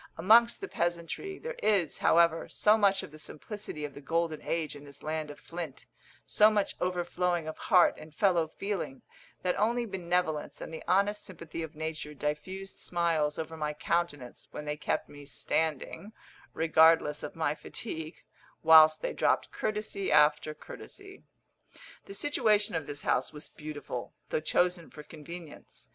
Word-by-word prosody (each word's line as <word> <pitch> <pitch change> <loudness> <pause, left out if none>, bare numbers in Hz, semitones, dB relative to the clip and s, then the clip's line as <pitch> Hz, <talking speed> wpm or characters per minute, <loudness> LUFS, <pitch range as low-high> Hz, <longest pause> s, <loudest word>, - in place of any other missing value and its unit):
Amongst 230 - +5
the 400 - -4
peasantry 175 - -2
there 485 +1 -6
is, 195 -7 +2
however, 165 -1 +4
so 210 +1 +4
much 200 -3 +3
of - - -9
the 155 - -12
simplicity 155 -1 -6
of 145 - -7
the 145 - -10
golden 165 +1 -1
age 160 -3 -2
in 145 - -11
this 140 -1 -11
land 155 0 -3
of 145 - -10
flint 165 -5 -7 0.4
so 215 0 +5
much 210 -2 0
overflowing 175 -1 0
of 155 - -4
heart 180 -5 +5
and 155 - -11
fellow 170 -1 +2
feeling, 190 -5 -4 0.4
that 180 -1 +1
only 235 +3 +2
benevolence 180 -5 -1
and - - -7
the 160 - -6
honest 200 +3 +2
sympathy 165 0 -7
of 160 -1 -6
nature 155 -1 -5
diffused 185 +7 -4
smiles 165 -4 0
over 160 0 -5
my 150 -1 -2
countenance 150 -5 -2
when 150 - -7
they 150 0 -2
kept 150 - -2
me 145 0 -12
standing, 160 +7 -2 0.4
regardless 160 -2 +4
of - - -6
my 160 -3 0
fatigue, 160 -1 -7 0.4
whilst 155 -1 +8
they - - -1
dropped - - +1
courtesy 210 -2 -2
after 150 +1 +4
courtesy. 390 - -11 0.8
The 195 - -8
situation 210 -5 +2
of 160 -3 -2
this 145 0 -5
house - - +1
was 150 0 -7
beautiful, 150 -5 -7 0.2
though - - +1
chosen 175 +2 +1
for 150 - -11
convenience. 165 +1 -11
165 Hz, 155 wpm, -30 LUFS, 150-195 Hz, 0.8 s, whilst